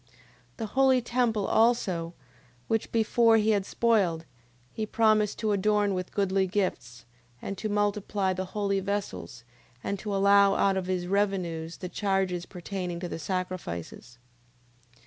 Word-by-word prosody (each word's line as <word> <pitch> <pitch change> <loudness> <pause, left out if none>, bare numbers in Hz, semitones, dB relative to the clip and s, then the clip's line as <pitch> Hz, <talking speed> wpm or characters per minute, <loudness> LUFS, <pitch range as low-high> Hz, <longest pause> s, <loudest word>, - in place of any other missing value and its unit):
9:16. 125 - -34 0.5
The 225 - -3
holy 260 +3 +3
temple 235 -4 0
also, 185 -8 +1 0.5
which 225 -1 -1
before 230 0 +4
he 220 0 +2
had 200 -2 0
spoiled, 195 -9 +1 0.5
he 215 -1 -4
promised 215 -2 +2
to 215 -1 -1
adorn 205 0 +2
with 185 -1 -4
goodly 195 -1 +1
gifts, 180 - -3 0.3
and 200 - -5
to 215 - -3
multiply 205 -1 0
the 185 +1 -3
holy 200 -1 +1
vessels, 185 - -4 0.4
and 200 0 -3
to 210 -2 -3
allow 200 0 +5
out 195 -1 +2
of 190 -1 -2
his 185 -1 -1
revenues 180 -4 -1
the 185 - -6
charges 190 -2 -1
pertaining 180 -1 -5
to 180 - -4
the 165 - -6
sacrifices. 150 - -5
195 Hz, 145 wpm, -28 LUFS, 180-210 Hz, 0.5 s, allow